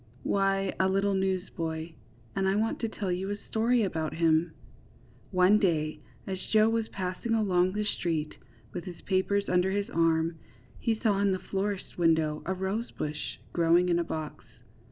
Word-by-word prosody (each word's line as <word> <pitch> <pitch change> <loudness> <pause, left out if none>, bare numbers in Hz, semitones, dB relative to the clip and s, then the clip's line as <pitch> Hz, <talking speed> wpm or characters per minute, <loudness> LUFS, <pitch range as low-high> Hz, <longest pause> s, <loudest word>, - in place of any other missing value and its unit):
Why, 195 -1 +1
a 190 - +3
little 195 +1 +2
newsboy, 175 -4 -2 0.4
and 195 -1 +1
I 190 - +2
want 220 +2 0
to 230 - -1
tell 200 -4 -3
you 185 +2 -2
a 205 - -2
story 230 +3 +1
about 160 -5 -2
him. 165 0 +2 0.8
One 185 +2 +5
day 155 -6 +1 0.3
as 190 -1 -4
Joe 215 0 +4
was 225 -1 0
passing 190 +5 -2
along 185 -4 +2
the 210 +1 -1
street, 165 -6 -2 0.4
with 175 -1 -5
his 180 -3 -8
papers 200 +1 +1
under 180 +1 +2
his 200 +1 -1
arm, 165 0 +2 0.4
he 225 -2 0
saw 210 -4 +2
in 200 -1 +3
the - - 0
florist's 195 0 -3
window 160 -2 +2
a 190 - +1
rosebush 190 -6 -3 0.2
growing 170 +1 +4
in 170 0 +3
a - - +1
box. 155 -3 -5
190 Hz, 165 wpm, -29 LUFS, 165-200 Hz, 0.8 s, One